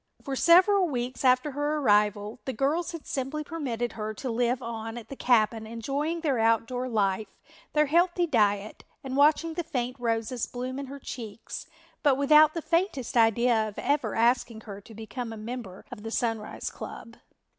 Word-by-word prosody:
For 275 Hz, -2 st, -3 dB
several 365 Hz, +5 st, +5 dB
weeks 250 Hz, -1 st, -3 dB
after 255 Hz, +3 st, +3 dB
her 290 Hz, +2 st, -1 dB
arrival 210 Hz, -3 st, +2 dB
the 265 Hz, -, -2 dB
girls 310 Hz, +9 st, 0 dB
had 335 Hz, -3 st, -8 dB
simply 275 Hz, +3 st, -3 dB
permitted 250 Hz, -7 st, -3 dB
her 215 Hz, -1 st, -5 dB
to 255 Hz, +2 st, -4 dB
live 240 Hz, +2 st, +1 dB
on 225 Hz, -1 st, -5 dB
at 235 Hz, -, -9 dB
the 275 Hz, -, -6 dB
cabin 220 Hz, -3 st, +2 dB
enjoying 280 Hz, +9 st, -2 dB
their 280 Hz, -7 st, +1 dB
outdoor 230 Hz, +3 st, +1 dB
life, 205 Hz, -2 st, 0 dB, 0.5 s
their 300 Hz, 0 st, +4 dB
healthy 345 Hz, +3 st, +2 dB
diet 210 Hz, -7 st, +1 dB, 0.2 s
and 265 Hz, -1 st, -4 dB
watching 310 Hz, +3 st, +4 dB
the 345 Hz, +1 st, -3 dB
faint 250 Hz, -4 st, -3 dB
roses 230 Hz, 0 st, -1 dB
bloom 255 Hz, +2 st, -5 dB
in 280 Hz, -, -5 dB
her 280 Hz, +2 st, -8 dB
cheeks 235 Hz, -3 st, -7 dB, 0.3 s
but 280 Hz, -3 st, +4 dB
without 300 Hz, +3 st, +6 dB
the 330 Hz, -, -3 dB
faintest 335 Hz, -, 0 dB
idea 230 Hz, 0 st, +3 dB
of 210 Hz, -, -9 dB
ever 290 Hz, +1 st, 0 dB
asking 235 Hz, -1 st, +1 dB
her 200 Hz, -2 st, -9 dB
to 220 Hz, +2 st, -14 dB
become 225 Hz, +2 st, -6 dB
a 225 Hz, -, -7 dB
member 215 Hz, -4 st, -7 dB
of -, -, -8 dB
the 225 Hz, -, -5 dB
Sunrise 225 Hz, -2 st, -2 dB
club. 230 Hz, +1 st, -9 dB
245 Hz, 175 wpm, -27 LUFS, 225-290 Hz, 0.5 s, without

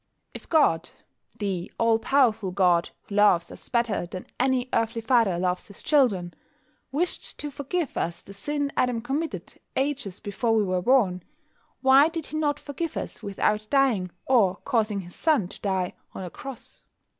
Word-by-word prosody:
If -, -, -11 dB
God 175 Hz, -, +3 dB, 0.5 s
(the 195 Hz, -5 st, -3 dB
All 230 Hz, -1 st, +3 dB
powerful 225 Hz, -6 st, +2 dB
God, 180 Hz, -2 st, +3 dB
who -, -, -10 dB
loves 200 Hz, -5 st, +4 dB
us -, -, -10 dB
better 235 Hz, -7 st, 0 dB
than 185 Hz, +1 st, -7 dB
an 255 Hz, -1 st, +2 dB
earthly 230 Hz, +1 st, +1 dB
father 225 Hz, -5 st, +3 dB
loves 180 Hz, 0 st, -1 dB
his 200 Hz, -, -11 dB
children) 205 Hz, -, +2 dB, 0.6 s
wished 335 Hz, +6 st, -2 dB
to 295 Hz, -, -4 dB
forgive 285 Hz, +4 st, -3 dB
us 170 Hz, +1 st, -2 dB
the 200 Hz, -, -11 dB
sin 285 Hz, +7 st, -2 dB
Adam 250 Hz, -2 st, +1 dB
committed 285 Hz, +7 st, -4 dB, 0.2 s
ages 265 Hz, -9 st, -2 dB
before 225 Hz, +3 st, 0 dB
we 215 Hz, -, +3 dB
were 185 Hz, -2 st, 0 dB
born, 195 Hz, -5 st, +3 dB, 0.6 s
why 270 Hz, +2 st, +7 dB
did 330 Hz, -2 st, -4 dB
He 310 Hz, -, -4 dB
not 295 Hz, -1 st, 0 dB
forgive 305 Hz, +3 st, -4 dB
us -, -, -5 dB
without 210 Hz, +1 st, 0 dB
dying, 255 Hz, -10 st, +2 dB, 0.2 s
or 215 Hz, -8 st, +4 dB
causing 215 Hz, -5 st, +1 dB
His 175 Hz, -1 st, -12 dB
Son 300 Hz, -, +2 dB
to -, -, -13 dB
die, 190 Hz, -3 st, -1 dB, 0.2 s
on -, -, -5 dB
a 180 Hz, -, -6 dB
cross? 270 Hz, -3 st, -9 dB
225 Hz, 165 wpm, -26 LUFS, 190-275 Hz, 0.6 s, why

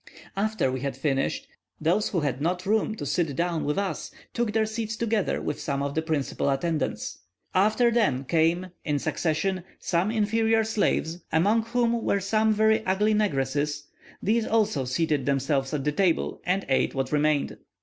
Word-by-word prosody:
After 215 Hz, -8 st, 0 dB
we 130 Hz, -, -3 dB
had 135 Hz, 0 st, -3 dB
finished, 135 Hz, -1 st, -1 dB, 0.3 s
those 180 Hz, +7 st, +1 dB
who 175 Hz, -, 0 dB
had 140 Hz, -2 st, -2 dB
not 180 Hz, +4 st, -1 dB
room 215 Hz, +1 st, +1 dB
to -, -, -6 dB
sit 160 Hz, -6 st, 0 dB
down 170 Hz, +1 st, -1 dB
with 150 Hz, -, -1 dB
us 200 Hz, -1 st, -2 dB, 0.2 s
took 235 Hz, -2 st, 0 dB
their 220 Hz, 0 st, +2 dB
seats 220 Hz, 0 st, -3 dB
together 225 Hz, -3 st, 0 dB
with 150 Hz, -, -4 dB
some 140 Hz, -1 st, -2 dB
of 140 Hz, 0 st, -2 dB
the 160 Hz, -, 0 dB
principal 155 Hz, -3 st, -1 dB
attendants: 155 Hz, +3 st, -2 dB, 0.3 s
after 215 Hz, +5 st, +3 dB
them 205 Hz, -, +2 dB
came, 170 Hz, +4 st, +1 dB
in 150 Hz, -2 st, 0 dB
succession, 170 Hz, +5 st, -1 dB, 0.3 s
the 170 Hz, 0 st, +3 dB
inferior 225 Hz, +1 st, +2 dB
slaves, 200 Hz, -6 st, 0 dB
among 205 Hz, +8 st, +3 dB
whom 235 Hz, 0 st, +1 dB
were 200 Hz, -, +1 dB
some 215 Hz, +3 st, +2 dB
very 220 Hz, +1 st, +3 dB
ugly 210 Hz, +3 st, +2 dB
negresses; 145 Hz, -7 st, 0 dB, 0.4 s
these 220 Hz, +3 st, +1 dB
also 210 Hz, -, +1 dB
seated 145 Hz, +1 st, 0 dB
themselves 135 Hz, 0 st, +1 dB
at 150 Hz, -3 st, -2 dB
the 150 Hz, -, +1 dB
table, 175 Hz, +1 st, 0 dB
and 190 Hz, +2 st, +1 dB
ate 135 Hz, +1 st, +1 dB
what 135 Hz, 0 st, -2 dB
remained. 150 Hz, -1 st, +1 dB
175 Hz, 170 wpm, -26 LUFS, 145-215 Hz, 0.4 s, after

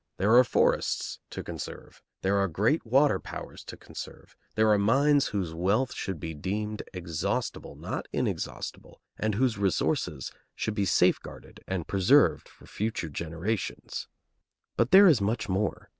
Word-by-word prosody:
There 105 Hz, +5 st, +4 dB
are 125 Hz, -, +9 dB
forests -, -, +1 dB
to -, -, -6 dB
conserve, -, -, -8 dB, 0.2 s
there 100 Hz, +1 st, +2 dB
are 100 Hz, 0 st, +2 dB
great 105 Hz, -, +1 dB
water 135 Hz, +5 st, +4 dB
powers -, -, -8 dB
to -, -, -8 dB
conserve, -, -, -10 dB, 0.2 s
there 110 Hz, 0 st, +4 dB
are 105 Hz, -, +4 dB
mines 140 Hz, +7 st, +3 dB
whose 95 Hz, -6 st, -3 dB
wealth 100 Hz, +10 st, +1 dB
should 95 Hz, -5 st, -4 dB
be 80 Hz, +1 st, -5 dB
deemed 105 Hz, +7 st, -3 dB
exhaustible, 85 Hz, -3 st, -3 dB
not -, -, -5 dB
inexhaustible, -, -, -4 dB, 0.2 s
and 110 Hz, -1 st, 0 dB
whose 120 Hz, -2 st, +1 dB
resources 80 Hz, -7 st, 0 dB, 0.2 s
should 110 Hz, -, -2 dB
be 100 Hz, -2 st, 0 dB
safeguarded 90 Hz, -, 0 dB
and 95 Hz, -4 st, -2 dB
preserved 95 Hz, -2 st, +3 dB
for -, -, -18 dB
future 105 Hz, -6 st, -3 dB
generations. 85 Hz, +7 st, -4 dB, 0.7 s
But 115 Hz, -, +2 dB
there 195 Hz, +5 st, +9 dB
is 150 Hz, -, +6 dB
much 105 Hz, +2 st, -1 dB
more. 100 Hz, +1 st, -1 dB
105 Hz, 145 wpm, -28 LUFS, 95-115 Hz, 0.7 s, are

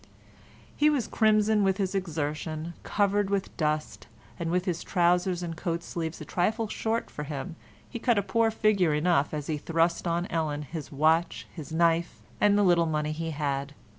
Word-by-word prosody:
He 300 Hz, +1 st, +4 dB
was 285 Hz, -6 st, +1 dB
crimson 215 Hz, -1 st, +3 dB
with 190 Hz, -1 st, +2 dB
his 195 Hz, -2 st, -1 dB
exertion; 155 Hz, -2 st, -3 dB
covered 205 Hz, -1 st, +1 dB
with 200 Hz, -1 st, -2 dB
dust, 155 Hz, -1 st, -2 dB, 0.3 s
and 170 Hz, -1 st, -2 dB
with 180 Hz, +1 st, 0 dB
his 175 Hz, -3 st, -1 dB
trousers 180 Hz, 0 st, +2 dB
and 165 Hz, -1 st, -4 dB
coat 170 Hz, 0 st, -3 dB
sleeves 165 Hz, -2 st, -4 dB
a -, -, -7 dB
trifle 220 Hz, +5 st, 0 dB
short 225 Hz, +2 st, -2 dB
for -, -, -6 dB
him 150 Hz, +3 st, -5 dB, 0.3 s
he 235 Hz, -, -6 dB
cut 235 Hz, -1 st, +2 dB
a 200 Hz, -, +2 dB
poor 230 Hz, +2 st, +2 dB
figure 200 Hz, -7 st, +2 dB
enough 155 Hz, -2 st, +2 dB
as 150 Hz, -2 st, -4 dB
he 150 Hz, -1 st, -2 dB
thrust 165 Hz, +3 st, 0 dB
on 170 Hz, +1 st, 0 dB
Ellen 150 Hz, -3 st, -1 dB
his 155 Hz, 0 st, -7 dB
watch, 160 Hz, +4 st, +2 dB
his 160 Hz, -3 st, -8 dB
knife, 170 Hz, +1 st, +1 dB, 0.2 s
and 205 Hz, 0 st, +4 dB
the 205 Hz, -, +4 dB
little 175 Hz, -3 st, +4 dB
money 150 Hz, -1 st, -1 dB
he 165 Hz, +1 st, -3 dB
had. 145 Hz, -2 st, -2 dB
170 Hz, 180 wpm, -28 LUFS, 155-200 Hz, 0.3 s, He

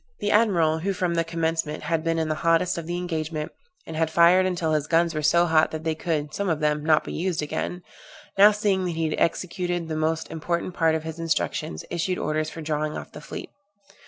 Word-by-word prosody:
The 205 Hz, -, 0 dB
admiral, 170 Hz, -8 st, +3 dB
who 195 Hz, +4 st, -1 dB
from 180 Hz, -2 st, -1 dB
the 165 Hz, 0 st, +1 dB
commencement 165 Hz, -2 st, -2 dB
had 160 Hz, +1 st, -1 dB
been 165 Hz, 0 st, 0 dB
in 160 Hz, -1 st, 0 dB
the 155 Hz, -, 0 dB
hottest 165 Hz, +2 st, +2 dB
of 165 Hz, -, -8 dB
the 175 Hz, 0 st, -2 dB
engagement, 160 Hz, -3 st, -3 dB, 0.3 s
and 160 Hz, -, -7 dB
had 160 Hz, 0 st, +1 dB
fired 170 Hz, +3 st, +5 dB
until 175 Hz, -3 st, -1 dB
his 150 Hz, -1 st, 0 dB
guns 170 Hz, 0 st, +2 dB
were 155 Hz, -, -2 dB
so 170 Hz, +3 st, +4 dB
hot 160 Hz, -2 st, +3 dB
that 155 Hz, 0 st, -6 dB
they 160 Hz, 0 st, 0 dB
could, 155 Hz, -2 st, -2 dB
some 200 Hz, +3 st, -1 dB
of 160 Hz, -2 st, 0 dB
them, 150 Hz, -1 st, 0 dB
not 155 Hz, 0 st, +4 dB
be -, -, -6 dB
used 175 Hz, -2 st, -1 dB
again; 175 Hz, +4 st, -4 dB, 0.5 s
now 205 Hz, +2 st, +8 dB
seeing 205 Hz, -3 st, 0 dB
that 180 Hz, -, -1 dB
he 165 Hz, 0 st, 0 dB
had 155 Hz, -, -2 dB
executed 175 Hz, -1 st, -1 dB
the 155 Hz, -, -2 dB
most 160 Hz, +1 st, -1 dB
important 170 Hz, +2 st, -2 dB
part 165 Hz, -2 st, +2 dB
of 160 Hz, -, -3 dB
his 160 Hz, +1 st, -6 dB
instructions, 160 Hz, -, -2 dB
issued 175 Hz, +2 st, -1 dB
orders 155 Hz, 0 st, -1 dB
for 165 Hz, -, -8 dB
drawing 150 Hz, 0 st, -2 dB
off -, -, -8 dB
the 150 Hz, -, -10 dB
fleet. 150 Hz, -, -8 dB
165 Hz, 225 wpm, -25 LUFS, 155-175 Hz, 0.5 s, now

